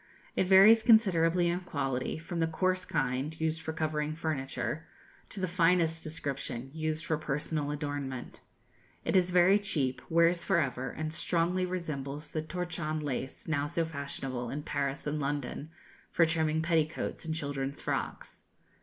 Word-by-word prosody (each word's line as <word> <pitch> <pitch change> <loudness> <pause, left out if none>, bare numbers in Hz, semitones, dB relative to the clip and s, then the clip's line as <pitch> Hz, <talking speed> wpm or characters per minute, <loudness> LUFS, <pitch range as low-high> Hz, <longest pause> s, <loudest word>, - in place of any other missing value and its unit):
It 185 - +2
varies 200 +4 +8
considerably 180 -7 +5
in 175 +1 +1
quality, 135 -8 -2
from 165 +2 -5
the 165 - +2
coarse 185 +3 0
kind, 140 +1 -1
used 160 0 0
for 160 - -3
covering 155 -1 -1
furniture, 155 0 -3 0.4
to 200 - -7
the 185 - 0
finest 165 -2 +2
description, 140 -5 -4
used 155 0 -2
for 160 -2 0
personal 150 0 -2
adornment 145 -3 -4 0.7
It - - 0
is 180 -1 +4
very 180 +3 +5
cheap, 145 -11 0
wears 170 +1 +4
for 190 +1 +2
ever, 130 -3 -1
and 155 +3 -4
strongly 175 +3 +1
resembles 150 -5 -4
the 155 - -2
torchon 165 -1 -3
lace, 135 -3 -4
now 145 -2 0
so 165 +2 0
fashionable 135 -5 -4
in 145 +2 -4
Paris 140 -2 -2
and 150 +1 -1
London 145 +1 -3 0.4
for 165 - +4
trimming 160 -1 +1
petticoats 160 -2 0
and 160 -1 -3
children's 140 -2 -3
frocks. - - -4
160 Hz, 150 wpm, -31 LUFS, 145-170 Hz, 0.7 s, varies